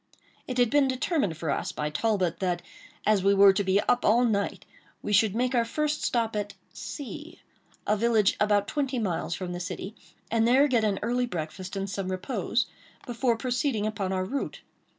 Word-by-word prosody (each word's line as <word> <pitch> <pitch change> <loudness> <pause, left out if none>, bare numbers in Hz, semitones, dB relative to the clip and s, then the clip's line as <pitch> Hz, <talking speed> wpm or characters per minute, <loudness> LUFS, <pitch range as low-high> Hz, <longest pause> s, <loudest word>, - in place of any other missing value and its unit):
It 255 - -4
had 245 -2 +3
been 285 -2 +4
determined 260 - 0
for 160 -3 -2
us - - -2
by 150 0 -3
Talbot, 185 0 0
that, 180 -2 -1 0.4
as 210 -3 +3
we 200 0 +4
were 195 0 +7
to 200 +1 0
be 190 +1 +3
up 245 - +1
all 235 +3 +4
night, 200 -3 -1 0.4
we 210 - -2
should 210 0 +4
make 250 +2 0
our 240 -2 +3
first 300 +5 -1
stop 230 -2 0
at 205 -1 -3 0.2
C——, 300 +4 -8 0.5
a 210 - +2
village 220 -2 +3
about 205 -1 +2
twenty 275 -3 -1
miles 175 -6 -1
from 180 -1 -5
the 175 - -4
city, 185 +3 -5 0.4
and 225 0 +3
there 265 +4 +5
get 240 -5 +2
an 205 -2 +1
early 245 +2 0
breakfast 180 +1 -5
and 195 0 -2
some 195 -1 -4
repose, 200 +5 -1 0.4
before 240 -1 0
proceeding 245 -2 -1
upon 205 -3 -2
our 185 -1 -1
route. 275 +8 -4
215 Hz, 190 wpm, -27 LUFS, 190-245 Hz, 0.5 s, were